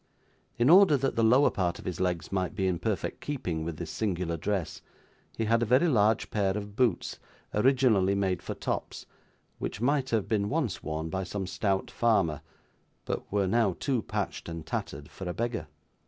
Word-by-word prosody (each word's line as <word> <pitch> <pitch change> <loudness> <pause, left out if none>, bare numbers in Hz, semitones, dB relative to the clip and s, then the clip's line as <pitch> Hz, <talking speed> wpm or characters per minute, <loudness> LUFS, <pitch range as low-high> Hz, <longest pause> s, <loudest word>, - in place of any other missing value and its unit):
In 120 - +3
order 180 -5 +7
that 135 0 -1
the 115 - +2
lower 125 +6 +5
part 90 -3 -1
of - - -12
his 90 - -4
legs 90 -3 -1
might 95 +1 -1
be 95 -2 0
in 90 -2 0
perfect 105 0 -2
keeping 90 - -3
with 80 -1 -4
this 85 -1 -5
singular 90 -5 -1
dress, 95 +1 -2 0.6
he 115 - 0
had 115 +2 +3
a - - +2
very 130 +9 +4
large 110 -5 +2
pair 100 -2 +1
of 100 -1 -7
boots, 120 -7 0 0.3
originally 110 -5 +3
made 95 -3 0
for - - -5
tops, - - -4 0.5
which - - -4
might 135 +2 +1
have 110 -4 0
been 105 -2 0
once 145 - -1
worn 80 +1 -4
by 95 0 -1
some 95 +1 -4
stout 95 0 -1
farmer, 85 -11 +2 0.6
but - - -4
were 100 -1 +2
now 100 -1 +2
too 130 -5 0
patched - - -4
and 80 -1 -6
tattered 70 -1 -4
for 95 +2 -7
a 90 - -4
beggar. 115 -9 -2
100 Hz, 185 wpm, -29 LUFS, 90-120 Hz, 0.6 s, order